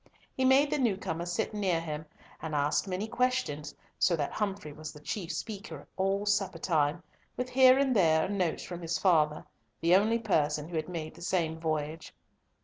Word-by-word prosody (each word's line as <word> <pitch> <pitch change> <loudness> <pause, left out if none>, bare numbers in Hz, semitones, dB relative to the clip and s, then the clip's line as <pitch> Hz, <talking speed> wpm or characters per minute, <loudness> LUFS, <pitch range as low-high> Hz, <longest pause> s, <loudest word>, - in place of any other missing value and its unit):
He 260 - +1
made 275 +2 +5
the 300 - +1
new 230 -7 +2
comer 170 -2 -4
sit 175 +4 -2
near 190 -5 +1
him, 155 -1 -5 0.3
and 155 -2 -4
asked 145 +6 +1
many 190 +3 -2
questions, 225 - -1 0.2
so 175 - +4
that 145 -3 -2
Humfrey 195 -8 -3
was 155 +1 -7
the 150 - -13
chief 175 +3 -4
speaker 170 -4 -6
all 195 +2 0
supper 200 -2 +1
time, 155 0 0 0.3
with 250 0 -2
here 260 0 +7
and 270 -2 +2
there 160 -5 +4
a - - -3
note 185 -5 -1
from 175 -1 -7
his 165 -1 -1
father, 155 -5 +2 0.3
the 170 +2 +4
only 215 +4 +3
person 155 -9 0
who 175 - -6
had 155 +1 -2
made 160 -3 -5
the 170 - -15
same 165 -3 -1
voyage. 155 0 -3
175 Hz, 190 wpm, -30 LUFS, 155-205 Hz, 0.3 s, here